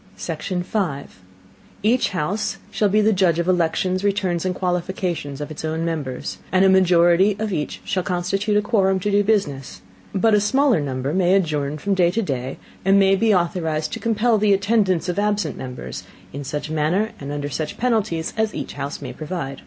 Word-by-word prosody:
Section 180 +2 -3
5. 175 - -3 0.6
Each 235 +4 +3
House 185 +4 -2
shall 210 - +1
be 210 +2 +3
the 215 +1 +3
Judge 180 -4 +2
of 170 - 0
the 185 - +3
Elections, 185 +2 0
Returns 190 -4 0
and 185 -1 -1
Qualifications 180 -5 -2
of 145 +1 -5
its 155 - -7
own 160 +1 -2
Members, 145 -6 -4
and 190 +1 +4
a - - +6
Majority 185 +1 +4
of 215 -2 -2
each 150 -3 -3
shall 185 - 0
constitute 195 +4 0
a 210 - +2
Quorum 195 -4 +2
to 205 +3 -1
do 205 0 +3
Business; 145 - -1 0.3
but 220 +3 +2
a 210 - +4
smaller 265 - +3
Number 135 0 -2
may 185 0 +3
adjourn 150 -5 0
from 200 +6 -1
day 180 -3 +3
to 220 +6 -1
day, 130 -6 -3 0.3
and 195 +1 +4
may 195 0 +5
be 220 +3 +2
authorized 165 -4 0
to - - -4
compel 225 0 +2
the 205 -1 +4
Attendance 195 -3 +1
of 180 +2 -1
absent 205 0 0
Members, 125 -1 -7 0.3
in 140 +1 -5
such 150 +2 -4
Manner, 160 +8 +1
and 140 0 -6
under 145 0 -3
such 155 +2 -4
Penalties 220 -9 0
as 220 -1 0
each - - -5
House 140 +2 -5
may - - -6
provide. 155 -4 -5
185 Hz, 190 wpm, -22 LUFS, 155-205 Hz, 0.6 s, a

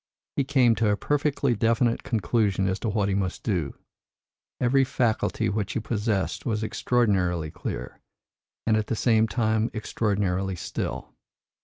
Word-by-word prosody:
He 140 - +2
came 130 -4 +4
to 110 -2 +2
a 105 - +2
perfectly 145 -2 +1
definite 115 +2 +2
conclusion 105 -3 +1
as 95 +1 -1
to 115 - -2
what 105 -1 +1
he 100 - 0
must 95 -2 -2
do. 90 -10 -1 0.8
Every 130 +2 +3
faculty 115 -3 0
which 105 -1 -2
he - - 0
possessed 105 -2 -1
was 110 -3 -1
extraordinarily 95 -9 +1
clear, 60 - -6 0.7
and 110 - +3
at 110 0 0
the - - -1
same 110 -1 +3
time 110 0 +1
extraordinarily 100 -3 -1
still. - - -5
110 Hz, 145 wpm, -26 LUFS, 100-120 Hz, 0.8 s, came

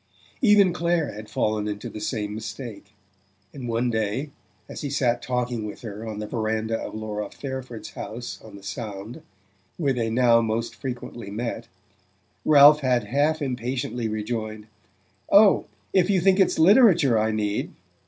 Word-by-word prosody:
Even 205 -6 +5
Clare 170 -3 0
had 105 +1 -9
fallen 105 -1 0
into 105 0 -4
the 105 - -8
same 105 -2 -3
mistake; 110 -2 -8 0.6
and 130 -3 -7
one 120 +1 0
day, 110 +6 -2 0.4
as - - -8
he 145 - -3
sat 125 -3 +1
talking 125 -2 -2
with 105 - -7
her 110 0 -7
on 110 -1 -5
the 105 - -4
verandah 110 0 -2
of - - -6
Laura 105 -1 -4
Fairford's 130 -4 -7
house 120 +3 -7
on 110 -2 -12
the 100 - -12
Sound 100 +2 -6 0.6
where 140 -5 +1
they 115 -3 -1
now 120 0 +4
most 115 +1 -2
frequently 120 -2 -6
met 115 +4 -4 0.8
Ralph 150 0 +8
had 125 -4 +1
half 145 +7 +1
impatiently 125 -2 -2
rejoined: 110 0 -4 0.7
"Oh, 205 0 +6 0.3
if 185 -1 +3
you 195 -2 +3
think 190 +2 +3
it's 190 - +3
literature 175 - +6
I 110 +1 +1
need 105 -1 -2
120 Hz, 155 wpm, -24 LUFS, 110-140 Hz, 0.8 s, Ralph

